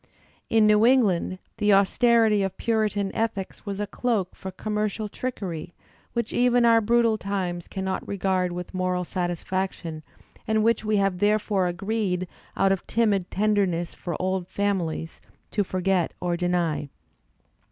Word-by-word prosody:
In 225 -1 +4
New 210 0 +5
England 215 -8 +3 0.2
the 210 -1 +3
austerity 220 +1 +4
of 195 -1 -2
Puritan 210 -3 0
ethics 220 -2 -3
was 200 0 -3
a 210 - 0
doak 210 -3 -1
for 190 - -7
conmiercial 210 +1 -2
trickery 180 -10 -5 0.4
which 235 -1 -2
even 245 -1 +4
our 230 -1 +6
brutal 230 0 +3
times 185 -3 -3
cannot 190 -1 -3
regard 190 -2 0
with 180 +1 -6
moral 185 -1 0
satisfaction, 175 -2 -3 0.5
and 220 -1 +2
which 230 0 +2
we 215 -1 +1
have 195 -2 +1
therefore 205 -2 +2
agreed, 185 0 -1 0.3
out 195 0 +3
of 195 - -1
timid 205 -5 +1
tenderness 195 -5 +1
for 170 -3 -5
old 185 -1 -1
f - - -23
amiUes, 180 -5 -1 0.3
to 205 - +1
forget 185 -2 0
or 175 -1 -1
deny. 170 -4 0
195 Hz, 140 wpm, -25 LUFS, 180-215 Hz, 0.5 s, our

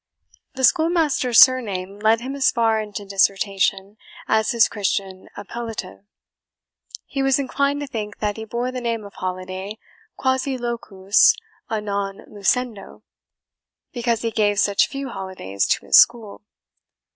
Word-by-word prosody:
The 260 - -4
schoolmaster's 315 -6 +3
surname 205 -7 +3
led 220 +2 +3
him 260 +3 -5
as 275 -2 +3
far 225 -2 +1
into 210 -1 -7
dissertation 195 0 0 0.3
as 220 0 +2
his 235 -3 +4
Christian 195 -2 -3
appellative. 210 -2 -7 1.0
He 275 - -4
was 270 -1 +3
inclined 280 +1 -1
to - - -3
think 215 -5 -6
that 210 -1 -2
he 220 - -7
bore 240 +3 -3
the 255 -1 -5
name 230 -3 -3
of 200 - -12
Holiday 185 +3 -5 0.4
QUASI 260 0 0
LUCUS 230 - +2 0.3
A 220 - -1
NON 200 -1 -4
LUCENDO, 210 0 -2 0.9
because 235 -2 -1
he 230 - -1
gave 205 -2 +1
such 200 -1 +3
few 275 -1 -6
holidays 185 - -4
to - - 0
his - - +7
school. 230 -4 +2
220 Hz, 135 wpm, -22 LUFS, 200-255 Hz, 1.0 s, his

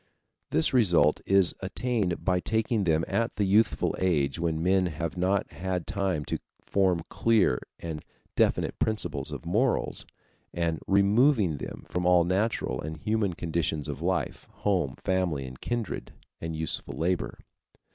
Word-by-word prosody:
This 80 - +3
result 85 - +4
is 95 -2 +5
attained 100 -1 -2
by 90 -1 +2
taking 110 +1 0
them 80 -1 +2
at 115 0 -1
the 105 - 0
youthful 105 +4 +2
age 75 -5 +1
when 80 -1 -1
men 95 0 +3
have 85 0 -4
not 95 +2 0
had 90 -1 -3
time 95 -7 -1
to - - -2 0.2
form 95 -4 +1
clear 110 - +2 0.2
and 80 -2 -6 0.3
definite - - +1
principles 110 -1 -1
of - - -7
morals, 115 +9 0 0.5
and 85 -2 0
removing 100 - +4
them - - -7
from 90 0 -1
all 90 -1 +6
natural 95 +6 0
and 80 +1 -5
human 105 +2 0
conditions 80 -3 -2
of 75 0 -5
life, 90 +2 -2
home, 90 -10 0
family 90 -7 -1
and 65 0 -10
kindred, 120 -2 -3 0.3
and 80 0 -4
useful 80 0 -2
labor. 80 -8 -1
90 Hz, 145 wpm, -28 LUFS, 80-100 Hz, 0.5 s, all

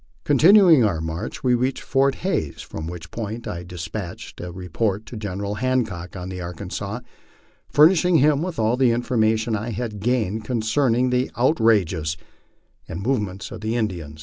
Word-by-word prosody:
Continuing 165 - +6
our 100 -7 +1
inarch, 80 +1 -5
we 125 -1 +3
reached 125 +2 0
Fort 135 0 +2
Hays, 80 - -1
from 80 - -7
which 85 -1 -8
point 115 +1 -5
I 85 - -4
des 90 -2 -7
patched 90 0 -7
a 90 0 -6
report 95 +4 -2
to 120 - -9
General 100 -1 -4
Hancock, 110 -10 -1
on 90 0 -6
the 90 -1 -6
Arkansas, 85 -2 -5 0.7
furnishing 170 +4 +5
him 150 +1 +3
all 110 +2 +2
the 130 -2 +4
information 115 -1 +1
I 110 +3 -3
had 115 -2 -4
gained 110 -2 0
concerning 120 +2 +1
the 125 +1 +1
outrages 100 - +2 0.7
and 80 - -5
movements 105 -4 -2
of 115 -3 -8
the 110 +2 -2
In 110 -3 +1
dians. 80 -5 -9
110 Hz, 160 wpm, -23 LUFS, 90-125 Hz, 0.7 s, Continuing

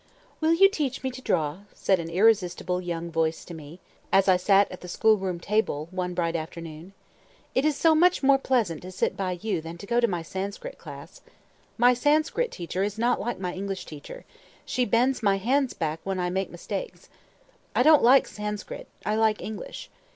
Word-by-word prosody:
"Will 320 +1 +3
you 390 +3 +7
teach 290 -10 -3
me 260 - -1
to 255 +1 -9
draw?" 155 - 0 0.2
said 190 -2 +2
an 165 0 -5
irresistible 180 -2 +2
young 170 -1 -4
voice 160 0 -1
to 175 - -9
me, 160 +2 -10 0.3
as 195 0 +4
I 185 - +6
sat 195 +2 +3
at 185 - -9
the 180 - -9
school 220 +5 +3
room 190 -3 -3
table, 170 -6 -1
one 180 -1 -3
bright 170 -1 -1
afternoon. 165 +2 -7 0.6
"It 265 - +1
is 305 -2 +2
so 320 +3 +4
much 350 0 +3
more 270 0 +5
pleasant 230 - 0
to 185 - -9
sit 185 - -1
by 185 -2 -2
you 215 -7 -1
than 165 +1 -8
to 185 - -9
go 235 +4 +1
to 235 - +3
my 175 -5 -3
Sanskrit 200 - -6
class. - - -11 0.6
My 245 +1 +5
Sanskrit 305 - +1
teacher 180 +2 -4
is 205 +1 -1
not 240 +2 +1
like 240 +3 -3
my 180 -2 -4
English 195 0 -4
teacher; 150 -2 -10 0.4
she 250 -2 0
bends 245 +4 +2
my 200 -3 +3
hands 260 +6 +1
back 160 -1 -2
when 195 -1 -2
I 180 0 -1
make 190 +1 -1
mistakes. - - -6 0.7
I - - +4
don't 310 +1 +7
like 260 +3 +6
Sanskrit, 210 0 -6 0.2
I 210 - 0
like 220 -1 +2
English. 215 -1 -7
195 Hz, 195 wpm, -26 LUFS, 175-245 Hz, 0.7 s, you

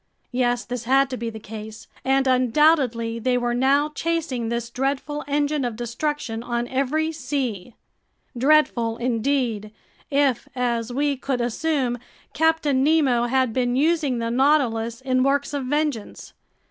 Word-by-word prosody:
Yes, 245 -1 0
this 245 -1 -5
had 270 +2 +3
to - - -2
be 235 -1 -4
the 220 -1 -8
case, 220 +1 -9 0.2
and 270 0 +2
undoubtedly 255 -3 +2
they 250 +2 +1
were 240 -1 0
now 275 +4 +2
chasing 300 -7 -2
this 235 0 -3
dreadful 275 +3 -2
engine 290 0 0
of 240 -3 -2
destruction 240 0 -3
on 240 0 -2
every 290 +5 0
sea! 250 - -4 0.6
Dreadful 250 -4 +2
indeed, 235 -3 -1 0.4
if, 280 -4 +1
as 240 -2 -1
we 280 +2 0
could 265 -1 -2
assume, 245 0 -1 0.3
Captain 310 -4 +2
Nemo 275 -6 +3
had 260 -2 +1
been 245 0 0
using 295 -2 +1
the 230 0 -2
Nautilus 240 -4 +1
in 255 -1 +1
works 280 +2 +1
of 280 -2 -2
vengeance! 290 -6 -2
255 Hz, 140 wpm, -23 LUFS, 235-285 Hz, 0.6 s, had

